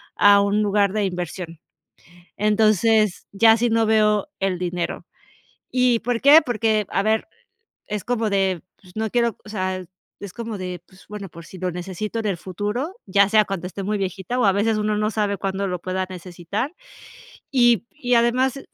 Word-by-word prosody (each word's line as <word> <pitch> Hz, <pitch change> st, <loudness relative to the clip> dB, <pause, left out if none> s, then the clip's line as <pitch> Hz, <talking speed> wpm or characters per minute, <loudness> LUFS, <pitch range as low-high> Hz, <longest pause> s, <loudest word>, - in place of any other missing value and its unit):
a 205 Hz, 0 st, +6 dB
un 200 Hz, +1 st, +1 dB
lugar 200 Hz, -1 st, +2 dB
de 215 Hz, -1 st, 0 dB
inversión. 175 Hz, -2 st, -5 dB, 0.8 s
Entonces, 215 Hz, -1 st, +2 dB
ya 225 Hz, +2 st, +6 dB
así 235 Hz, +1 st, +1 dB
no 225 Hz, 0 st, +2 dB
veo 215 Hz, +1 st, +3 dB
el 195 Hz, -2 st, 0 dB
dinero. 175 Hz, -1 st, -3 dB, 0.7 s
Y 250 Hz, -2 st, +3 dB
¿por 245 Hz, 0 st, -1 dB
qué? 295 Hz, +3 st, +8 dB
Porque 220 Hz, -3 st, +1 dB
a 195 Hz, -, 0 dB
ver, 220 Hz, +3 st, +1 dB, 0.6 s
es 210 Hz, -2 st, -4 dB
como 230 Hz, -3 st, 0 dB
de, 190 Hz, -3 st, +1 dB, 0.2 s
pues 180 Hz, -2 st, -18 dB
no 220 Hz, 0 st, -1 dB
quiero, 235 Hz, -1 st, +1 dB
o -, -, -11 dB
sea, 185 Hz, -3 st, -3 dB, 0.4 s
es 200 Hz, -2 st, -8 dB
como 230 Hz, -2 st, -5 dB
de, 180 Hz, -1 st, -5 dB
pues 190 Hz, 0 st, -20 dB
bueno, 205 Hz, -1 st, -7 dB
por 170 Hz, 0 st, -12 dB
si 190 Hz, -, -12 dB
lo 180 Hz, 0 st, -2 dB
necesito 190 Hz, +5 st, -5 dB
en 220 Hz, -, -2 dB
el 195 Hz, -4 st, -1 dB
futuro, 210 Hz, -, -4 dB
ya 200 Hz, +1 st, +4 dB
sea 215 Hz, +1 st, +4 dB
cuando 195 Hz, -3 st, -5 dB
esté 195 Hz, +2 st, -7 dB
muy 210 Hz, +2 st, -1 dB
viejita 195 Hz, +4 st, -3 dB
o 245 Hz, -, +3 dB
a 195 Hz, -, +5 dB
veces 215 Hz, +2 st, +1 dB
uno 210 Hz, 0 st, 0 dB
no 210 Hz, 0 st, 0 dB
sabe 210 Hz, -2 st, 0 dB
cuándo 195 Hz, 0 st, -2 dB
lo 180 Hz, -1 st, -3 dB
pueda 185 Hz, +1 st, -2 dB
necesitar. 185 Hz, -, -5 dB, 0.8 s
Y 240 Hz, -4 st, +4 dB
y 250 Hz, -6 st, 0 dB
además 250 Hz, +3 st, +2 dB
210 Hz, 185 wpm, -22 LUFS, 185-225 Hz, 0.8 s, qué